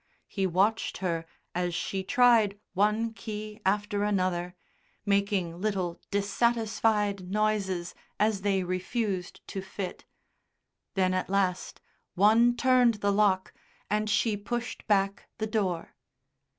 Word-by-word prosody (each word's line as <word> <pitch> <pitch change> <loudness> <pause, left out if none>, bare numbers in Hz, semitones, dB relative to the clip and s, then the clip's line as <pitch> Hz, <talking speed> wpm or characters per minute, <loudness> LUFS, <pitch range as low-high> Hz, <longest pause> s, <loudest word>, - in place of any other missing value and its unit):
He 195 -2 -1
watched 195 +5 +1
her 165 -3 -2 0.3
as 175 -1 -1
she 190 +2 -2
tried 220 -1 +4
one 210 +4 +1
key 215 0 -7
after 205 +1 0
another, 185 -3 0 0.5
making 200 -4 0
little 190 -5 -2
dissatisfied 210 -2 +1
noises 195 -4 0 0.3
as 210 -2 +2
they 195 -1 +1
refused 185 +1 -3
to 195 - -4
fit; 190 -1 -6 0.9
then 185 -1 +2
at 185 0 -1
last 190 -2 -1 0.3
one 225 +5 +5
turned 250 -2 +4
the 205 -1 0
lock 195 -2 +2 0.4
and 215 0 +1
she 215 +1 +2
pushed 240 +4 -5
back 195 -1 +1
the 220 - -1
door. 195 -6 -2
200 Hz, 115 wpm, -28 LUFS, 185-215 Hz, 0.9 s, one